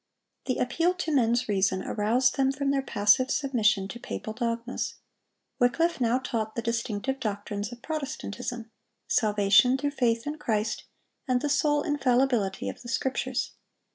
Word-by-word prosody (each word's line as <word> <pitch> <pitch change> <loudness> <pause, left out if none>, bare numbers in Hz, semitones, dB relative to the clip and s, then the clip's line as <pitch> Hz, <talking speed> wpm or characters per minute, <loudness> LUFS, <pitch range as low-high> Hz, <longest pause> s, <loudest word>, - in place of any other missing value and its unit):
The 255 - -1
appeal 335 +8 +1
to 330 -4 -2
men's 240 -1 +2
reason 190 -2 +1
aroused 235 +5 +1
them 270 -1 +2
from 275 0 -1
their 275 -1 +1
passive 210 +1 +3
submission 220 -8 +1
to 235 - -7
papal 215 - -5
dogmas. 235 +1 -3 0.6
Wycliffe 300 +5 +2
now 240 +1 +3
taught 225 -4 -3
the 235 - -2
distinctive 230 +3 -2
doctrines 205 0 -3
of 240 0 -11
Protestantism,—salvation 245 - 0
through 285 +1 -1
faith 235 -4 +1
in 300 +1 -4
Christ, 220 -5 -1 0.4
and 255 -1 +2
the 295 - -2
sole 295 0 +2
infallibility 255 - +1
of - - -6
the 240 - -9
Scriptures. 260 +1 -1
245 Hz, 140 wpm, -27 LUFS, 220-270 Hz, 0.6 s, passive